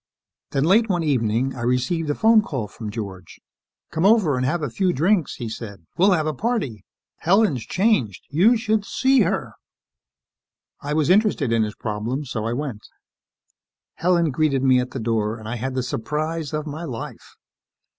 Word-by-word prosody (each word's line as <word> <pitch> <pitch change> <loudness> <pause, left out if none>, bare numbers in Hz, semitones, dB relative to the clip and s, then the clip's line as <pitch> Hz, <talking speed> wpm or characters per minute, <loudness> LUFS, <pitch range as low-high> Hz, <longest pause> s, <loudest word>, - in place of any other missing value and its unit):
Then, 135 - 0
late 210 +7 +4
one 175 -3 +1
evening, 130 -2 +1
I 120 - -7
received 125 +7 0
a 145 - 0
phone 225 0 +5
call 135 - -4
from 105 +1 -8
George. 100 -4 -7 0.5
"Come 160 - -1
over 195 - +4
and 125 - -1
have 165 +3 -1
a 145 - -1
few 185 - +1
drinks," 175 +4 +1
he 120 - -5
said. 105 -5 -8
"We'll 195 +2 +4
have 155 -4 +1
a 155 - -1
party! 175 - -2 0.3
Helen's 170 - +2
changed. 180 - +1
You 200 +11 +4
should 220 -2 0
see 265 +5 +2
her!" 175 - -1 1.3
I 145 +1 -3
was 155 +1 +2
interested 190 - +2
in 115 - +3
his 105 -1 -2
problem, 115 +7 -3
so 110 -4 -4
I 115 - -1
went. 125 -5 -4 1.1
Helen 170 -2 +1
greeted 140 -1 +1
me 130 -1 +5
at 125 0 -2
the 135 - -6
door 110 -1 -1
and 110 -1 -10
I 120 +2 -3
had 130 +3 -4
the 130 - 0
surprise 150 +5 -3
of 150 0 -3
my 155 +2 -6
life. 125 -9 -7
145 Hz, 175 wpm, -22 LUFS, 115-180 Hz, 1.3 s, phone